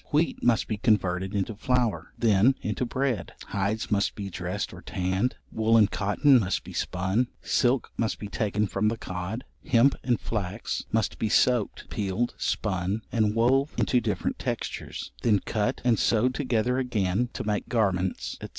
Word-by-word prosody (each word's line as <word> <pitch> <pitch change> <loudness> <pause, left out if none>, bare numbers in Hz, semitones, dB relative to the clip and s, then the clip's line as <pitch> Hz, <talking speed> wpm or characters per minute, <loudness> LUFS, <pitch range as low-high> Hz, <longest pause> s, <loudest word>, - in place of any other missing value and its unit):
Wheat 155 +3 +1
must 120 -2 +3
be 110 - -2
converted 95 -3 +1
into 100 +3 -1
flour, 125 0 0
then 115 +3 +4
into 110 +4 -1
bread; 130 -3 -1 0.2
hides 105 +3 -1
must 100 -1 +1
be 100 -2 -5
dressed 90 +4 -3
or 90 - -10
tanned; 95 +6 -1 0.2
wool 110 +1 +3
and 105 -2 +5
cotton 125 +7 +4
must 100 -3 -1
be - - -10
spun; 95 +7 0 0.2
silk 125 +1 +1
must 115 -1 0
be 105 - -6
taken 105 0 0
from 100 +1 0
the 115 +1 0
cod; 95 +6 -5 0.2
hemp 125 +4 +4
and 120 -2 +1
flax 105 0 -3
must 110 -1 0
be 110 - 0
soaked, 120 0 +2
peeled, 105 +3 -1
spun, 100 +1 -1
and 110 -2 +1
wove 135 +5 +2
into 125 -2 +2
different - - -2
textures; - - -4
then 110 -3 +4
cut 110 +5 -1
and 120 -2 +3
sewed 120 +3 +2
together 125 -2 0
again 115 -2 0
to - - -4
make 105 -1 -2
garments, 95 -6 0
&c. - - -5
110 Hz, 165 wpm, -27 LUFS, 100-120 Hz, 0.2 s, and